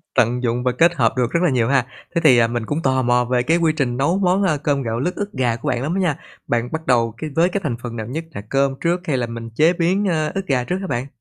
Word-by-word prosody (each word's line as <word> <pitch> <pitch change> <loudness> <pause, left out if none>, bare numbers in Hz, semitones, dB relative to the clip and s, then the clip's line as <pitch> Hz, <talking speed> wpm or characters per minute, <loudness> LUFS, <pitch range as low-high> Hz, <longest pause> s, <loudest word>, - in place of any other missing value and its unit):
tận 125 +2 +2
dụng 120 0 0
và 125 - +2
kết 170 +7 +3
hợp 115 -6 +2
được 120 -2 +1
rất 170 - +1
là 180 - +4
nhiều 120 -3 +1
ha. 135 -3 +2 0.3
Thế 170 - +2
thì, 130 -5 +6
ờ, 115 - +4
mình 120 -1 -3
cũng 145 +8 -2
tò 130 -3 +1
mò 125 0 +2
về 125 0 +1
cái 160 +6 +2
quy 165 -2 +2
trình 125 -4 0
nấu 155 +8 +1
món, 190 +1 +2
ơ, 165 -6 +2
cơm 140 -1 0
gạo 115 0 -2
lứt 175 +8 -2
ức 205 0 -4
gà 125 -4 0
của 140 +5 -7
bạn 120 - -1
lắm 150 +5 -2
á - - 0
nha. 160 -5 0 0.3
Bạn 120 +1 0
bắt 160 0 -5
đầu 115 -3 +2
cái 155 - -5
với 170 +2 +3
cái 195 +2 -2
thành 140 -7 -1
phần 120 -1 -6
nào 110 -2 -5
nhất, 155 +7 -4
là 100 - -7
cơm 135 0 +1
trước 175 +1 0
hay 140 -4 +1
là 120 - -1
mình 115 0 -7
chế 160 +6 +4
biến, 180 +4 +1
ơ, 155 -4 0
ức 195 - -2
gà 130 -3 +1
trước 180 +9 -2
hả 190 - -4
bạn? 125 -3 -2
135 Hz, 310 wpm, -20 LUFS, 120-165 Hz, 0.3 s, thì